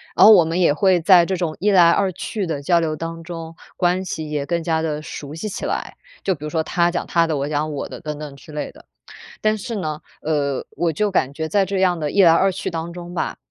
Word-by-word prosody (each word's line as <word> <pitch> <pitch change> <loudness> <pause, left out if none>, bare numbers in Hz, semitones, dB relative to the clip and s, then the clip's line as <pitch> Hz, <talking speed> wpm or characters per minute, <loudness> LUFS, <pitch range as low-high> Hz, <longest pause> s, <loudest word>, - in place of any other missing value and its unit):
然 - - +7
后 220 - +10
我 180 -6 +7
们 165 +3 -1
也 170 -5 +4
会 185 +2 +3
在 175 0 +6
这 190 - -1
种 165 -3 -2
一 205 +1 +2
来 175 -3 +6
二 195 +2 +1
去 200 +3 -4
的 150 -4 -3
交 170 +4 +3
流 160 -2 -1
当 165 +1 -6
中， 165 -1 -8 0.2
关 180 +1 +1
系 155 -3 -5
也 145 -2 -2
更 170 -1 -1
加 160 -1 0
地 150 -2 -2
熟 150 -1 -8
悉 190 +6 -5
起 - - -5
来， - - -3 0.3
就 190 - +1
比 150 - -13
如 150 - -3
说 160 -1 0
他 170 +1 +1
讲 175 - -2
他 170 -2 +3
的， 155 -3 -1
我 140 +2 -2
讲 155 +1 -1
我 140 - -4
的 - - -8
等 150 -2 -5
等 150 -2 -7
之 140 +3 -14
类 150 -1 -4
的。 - - -18 0.6
但 215 0 +2
是 225 +3 -6
呢， 155 -6 -3 0.2
呃， 145 -3 -1
我 165 +1 0
就 210 +6 0
感 140 -8 0
觉 160 +2 -4
在 200 +3 +2
这 195 0 -2
样 180 -2 +2
的 150 -1 -1
一 200 - +4
来 165 - +7
二 190 +4 +4
去 - - -4
当 165 0 -4
中 175 0 -9
吧， 170 - -2
165 Hz, 285 characters per minute, -21 LUFS, 155-185 Hz, 0.6 s, 后